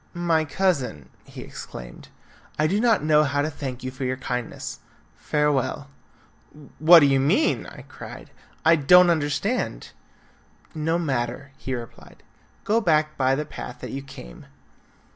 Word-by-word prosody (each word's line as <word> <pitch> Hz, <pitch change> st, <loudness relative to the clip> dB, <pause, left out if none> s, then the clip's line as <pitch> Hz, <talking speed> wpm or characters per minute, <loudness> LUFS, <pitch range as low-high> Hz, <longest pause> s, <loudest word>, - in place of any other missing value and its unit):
"My 165 Hz, -2 st, +1 dB
cousin," 140 Hz, -, -1 dB, 0.2 s
he -, -, -10 dB
exclaimed, -, -, -10 dB, 0.5 s
"I 155 Hz, -, +2 dB
do 195 Hz, +6 st, +1 dB
not 225 Hz, -7 st, +3 dB
know 150 Hz, 0 st, +4 dB
how 145 Hz, 0 st, 0 dB
to 155 Hz, -, -2 dB
thank 130 Hz, -3 st, -6 dB
you 130 Hz, -, -4 dB
for 130 Hz, +1 st, -7 dB
your 130 Hz, 0 st, -1 dB
kindness. 125 Hz, -2 st, -5 dB, 0.4 s
Farewell." 145 Hz, -, -1 dB, 0.9 s
"What 165 Hz, +2 st, +8 dB
do -, -, +6 dB
you 135 Hz, -1 st, +3 dB
mean?" 170 Hz, -, +1 dB
I -, -, -11 dB
cried. -, -, -11 dB, 0.3 s
"I 165 Hz, +1 st, +6 dB
don't 175 Hz, +5 st, +6 dB
understand." 160 Hz, -, -2 dB, 0.8 s
"No 160 Hz, +2 st, 0 dB
matter," 135 Hz, -3 st, -3 dB
he 130 Hz, 0 st, -4 dB
replied, 120 Hz, -1 st, -11 dB, 0.4 s
"go 225 Hz, +2 st, +2 dB
back 155 Hz, -5 st, +2 dB
by 130 Hz, -1 st, +2 dB
the 150 Hz, +2 st, -3 dB
path 125 Hz, -4 st, -8 dB
that -, -, -6 dB
you 135 Hz, -, -4 dB
came." 130 Hz, -, -12 dB
145 Hz, 145 wpm, -24 LUFS, 130-165 Hz, 0.9 s, What